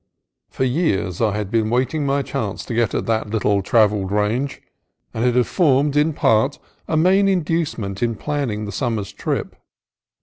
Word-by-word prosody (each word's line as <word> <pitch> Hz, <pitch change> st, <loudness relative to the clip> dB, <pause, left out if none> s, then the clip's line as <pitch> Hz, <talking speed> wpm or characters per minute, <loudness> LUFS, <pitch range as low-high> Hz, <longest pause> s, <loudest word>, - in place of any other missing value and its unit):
For -, -, -3 dB
years 120 Hz, -, 0 dB
I 105 Hz, -2 st, +1 dB
had 105 Hz, -2 st, -4 dB
been 110 Hz, -2 st, +1 dB
waiting 130 Hz, +5 st, 0 dB
my 140 Hz, 0 st, +1 dB
chance 105 Hz, -5 st, -4 dB
to -, -, -5 dB
get 115 Hz, -2 st, +1 dB
at -, -, -1 dB
that 110 Hz, -2 st, -1 dB
little 105 Hz, -2 st, +1 dB
travelled 105 Hz, -2 st, +2 dB
range, 110 Hz, +7 st, 0 dB, 0.5 s
and 115 Hz, -, -2 dB
it 125 Hz, -1 st, +2 dB
had 125 Hz, -1 st, +4 dB
formed, 145 Hz, -4 st, +2 dB
in 150 Hz, +2 st, +3 dB
fact, 130 Hz, -1 st, +2 dB, 0.3 s
a 155 Hz, -, 0 dB
main 190 Hz, +5 st, +4 dB
induce 170 Hz, -4 st, 0 dB
ment 100 Hz, -3 st, -5 dB
in 115 Hz, -1 st, 0 dB
planning 125 Hz, -5 st, -3 dB
the 105 Hz, -, -5 dB
summer's 110 Hz, -2 st, -2 dB
trip. -, -, -3 dB
120 Hz, 175 wpm, -21 LUFS, 105-145 Hz, 0.5 s, had